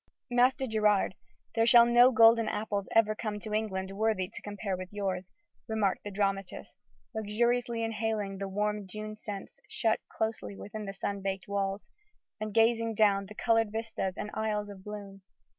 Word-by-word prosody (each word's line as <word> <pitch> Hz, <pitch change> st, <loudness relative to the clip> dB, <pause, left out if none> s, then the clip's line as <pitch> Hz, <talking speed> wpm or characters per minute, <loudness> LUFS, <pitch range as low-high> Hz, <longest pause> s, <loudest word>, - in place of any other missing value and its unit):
"Master 250 Hz, +2 st, +3 dB
Gerard, 210 Hz, -5 st, +2 dB, 0.4 s
there 225 Hz, 0 st, +2 dB
shall 235 Hz, -1 st, +8 dB
no 240 Hz, +2 st, +6 dB
golden 225 Hz, -1 st, +6 dB
apples 205 Hz, -2 st, -2 dB
ever 220 Hz, -1 st, +5 dB
come 215 Hz, -1 st, -4 dB
to 215 Hz, 0 st, -5 dB
England 195 Hz, -3 st, -1 dB
worthy 205 Hz, -2 st, 0 dB
to -, -, -7 dB
compare 205 Hz, -1 st, -3 dB
with 185 Hz, 0 st, -7 dB
yours," 190 Hz, -3 st, -3 dB, 0.4 s
remarked 215 Hz, -4 st, 0 dB
the 205 Hz, -, -5 dB
dramatist, 195 Hz, -1 st, -2 dB, 0.4 s
luxuriously 235 Hz, +2 st, 0 dB
inhaling 215 Hz, -3 st, -2 dB
the 195 Hz, -, -3 dB
warm 210 Hz, +1 st, -1 dB
June 215 Hz, +2 st, -6 dB
scents 205 Hz, -2 st, -8 dB
shut 225 Hz, -2 st, +1 dB
closely 220 Hz, -2 st, -3 dB
within 205 Hz, 0 st, -6 dB
sun 200 Hz, 0 st, -4 dB
baked 190 Hz, -1 st, -3 dB
walls, 200 Hz, 0 st, -2 dB, 0.5 s
and 215 Hz, 0 st, -3 dB
gazing 225 Hz, +1 st, +3 dB
down 200 Hz, -2 st, +3 dB
the 210 Hz, -, -11 dB
coloured 225 Hz, -2 st, +2 dB
vistas 220 Hz, -4 st, -3 dB
and 210 Hz, -, -4 dB
aisles 210 Hz, -1 st, -2 dB
of 190 Hz, -2 st, -12 dB
bloom. 200 Hz, -1 st, -8 dB
210 Hz, 160 wpm, -30 LUFS, 195-225 Hz, 0.5 s, shall